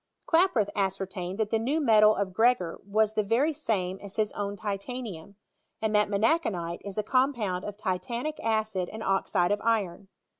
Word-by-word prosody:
Klaproth 325 - +3
ascertained 190 -1 -2
that 220 -2 -1
the 225 - +2
new 270 +8 0
tnetal 215 -7 +5
of 195 -2 -2
Gregor 225 -5 +2
iras 215 0 +2
the 215 - +2
very 235 +10 +1
same 195 -10 -2
as 200 -1 -9
hia 215 - +2
own 200 0 -3
titanium, 200 -2 -5 0.4
and 220 -1 -1
that 210 -1 +3
menacbanite 200 - 0
is 200 0 -6
a 215 - +1
compound 235 -7 +1
of 205 -1 -6
titanic 235 +9 -3
acid 215 -5 -1
and 220 +1 -6
oxide 190 -2 +1
of 205 0 0
iron. 200 -5 -1
210 Hz, 165 wpm, -28 LUFS, 195-230 Hz, 0.4 s, tnetal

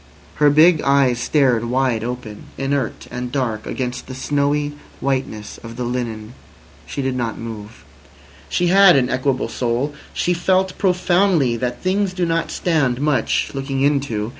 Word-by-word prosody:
Her 150 -1 +5
big 155 +2 +5
eyes 135 -3 +3
stared 125 -2 +2
wide 125 -2 0
open, 120 -3 -6
inert 135 -3 -2
and 125 0 -5
dark 115 -6 -2
against 125 -1 -4
the 130 - -7
snowy 145 +2 0 0.3
whiteness 130 -6 -3
of 115 0 -10
the 125 - -4
linen. 120 -2 -4 0.5
She 140 - -4
did 130 -1 -1
not 120 -3 -2
move. 110 -1 -9 0.6
She 175 -1 +1
had 195 0 +7
an 130 -2 +2
equable 130 0 0
soul. 125 +4 -1 0.2
She 180 - 0
felt 185 +2 +1
profoundly 180 -7 +2
that 120 +1 -4
things 190 +1 0
do 180 -1 0
not 165 0 0
stand 145 -8 0
much 140 -5 0
looking 135 -1 -3
into. 135 -7 0
135 Hz, 150 wpm, -20 LUFS, 120-150 Hz, 0.6 s, had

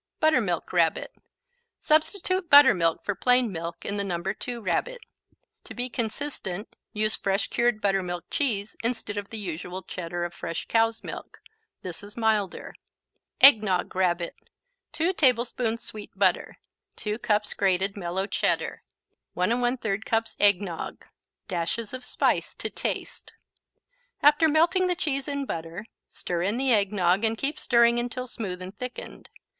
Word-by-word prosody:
Buttermilk 240 - +1
Rabbit 165 -2 +1 0.6
Substitute 350 +3 +1
buttermilk 205 - +6
for 205 - 0
plain 245 +3 +3
milk 170 0 -6
in 200 - -2
the 200 - 0
No. 180 -3 -2
2 210 +6 -4
Rabbit. 230 - -1 0.7
To - - -10
be 245 0 -3
consistent, 220 -5 -4 0.2
use 215 0 +1
fresh 195 +1 -1
cured 240 -2 +1
Buttermilk 190 -4 -1
Cheese, 215 -7 -1
instead 230 -3 -2
of 205 -1 -5
the 225 - -3
usual 180 -1 -5
Cheddar 175 0 -5
of 175 0 -4
fresh 165 -1 -5
cow's 225 0 +2
milk. - - -8 0.4
This 180 -3 -6
is 205 +2 -12
milder. 220 -4 0 0.7
Eggnog 210 -11 +6
Rabbit 175 -2 0 0.6
2 335 +4 0
tablespoons 240 -5 +1
sweet 215 -1 -4
butter - - +1 0.4
2 210 +1 -3
cups 210 -2 +1
grated 195 0 +1
mellow 190 0 -2
Cheddar - - -1 0.5
1 180 +2 +1
1/3 240 -4 0
cups 225 0 -1
eggnog 200 -4 +1 0.4
Dashes 190 +6 -2
of 255 0 -6
spice - - 0
to - - -4
taste. - - -4 0.9
After 295 +2 +6
melting 345 +5 +3
the 360 - +1
cheese 285 -5 -2
in 280 -1 -2
butter, 165 +1 -5 0.2
stir 175 -1 -4
in 200 +6 0
the 260 -1 +3
eggnog 200 -2 +2
and 225 0 +1
keep 285 +5 -2
stirring 235 -1 +4
until 245 +1 -3
smooth 190 -7 -5
and 185 +3 -9
thickened. 250 +3 -8
215 Hz, 140 wpm, -26 LUFS, 185-250 Hz, 0.9 s, buttermilk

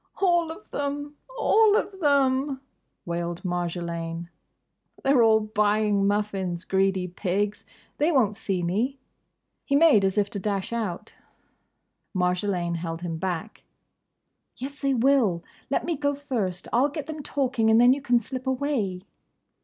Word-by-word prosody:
"All 345 -4 +3
of 335 +6 -12
them! 290 +1 -3 0.2
All 440 -2 +4
of 405 -3 -1
them!" 275 -3 +2 0.5
wailed 170 0 -3
Marjolaine. 170 -1 -3 0.7
"They 275 - +3
're 255 - +5
all 220 -1 +5
buying 210 -1 +1
muffins—greedy 195 -2 0
pigs!—They 205 - -2
won't 230 -9 +2
see 190 -4 -2
me." 220 +11 0 0.7
He 280 - 0
made 290 -9 +6
as 190 +1 +1
if 205 -1 +3
to 200 - -4
dash 200 +2 -2
out. 215 -7 -4 1.0
Marjolaine 180 -1 0
held 165 0 -5
him 165 -2 -4
back. 185 +4 -4 0.9
"Yes, 280 +3 -7
they 275 -1 +1
will. 235 -9 +3 0.3
Let - - 0
me 340 - -1
go 285 0 0
first. 225 -11 -3
I'll 255 +5 +4
get 295 0 -5
them 310 -1 -6
talking, 260 -6 0
and 220 +1 +6
then 245 +1 +7
you 280 - -4
can 245 -3 +3
slip 255 +3 -6
away." 255 -9 -1
220 Hz, 140 wpm, -26 LUFS, 185-280 Hz, 1.0 s, then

